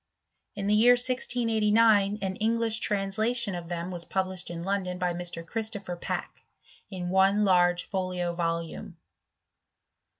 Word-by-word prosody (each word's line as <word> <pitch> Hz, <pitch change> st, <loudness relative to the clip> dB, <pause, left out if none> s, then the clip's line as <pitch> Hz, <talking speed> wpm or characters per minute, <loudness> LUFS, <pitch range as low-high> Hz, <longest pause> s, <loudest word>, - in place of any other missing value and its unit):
In 200 Hz, -, -4 dB
the 205 Hz, -, +2 dB
year 235 Hz, +4 st, +6 dB
1689 225 Hz, -4 st, +2 dB
an 190 Hz, 0 st, -2 dB
English 225 Hz, 0 st, +1 dB
translation 210 Hz, +3 st, 0 dB
of 175 Hz, -1 st, -6 dB
them 175 Hz, +1 st, -4 dB
was 175 Hz, -2 st, -3 dB
f>ublished 185 Hz, 0 st, -3 dB
in 170 Hz, -1 st, -6 dB
London 190 Hz, -1 st, -2 dB
by 180 Hz, -1 st, -1 dB
Mr. 175 Hz, -1 st, -5 dB
Christopher 205 Hz, -3 st, -5 dB
Packe, 175 Hz, -, -5 dB, 0.5 s
in 180 Hz, -3 st, -5 dB
one 190 Hz, +1 st, +4 dB
arge 175 Hz, -2 st, +3 dB
folio 180 Hz, -2 st, -2 dB
volume. 170 Hz, +2 st, -4 dB
195 Hz, 130 wpm, -27 LUFS, 175-215 Hz, 0.5 s, year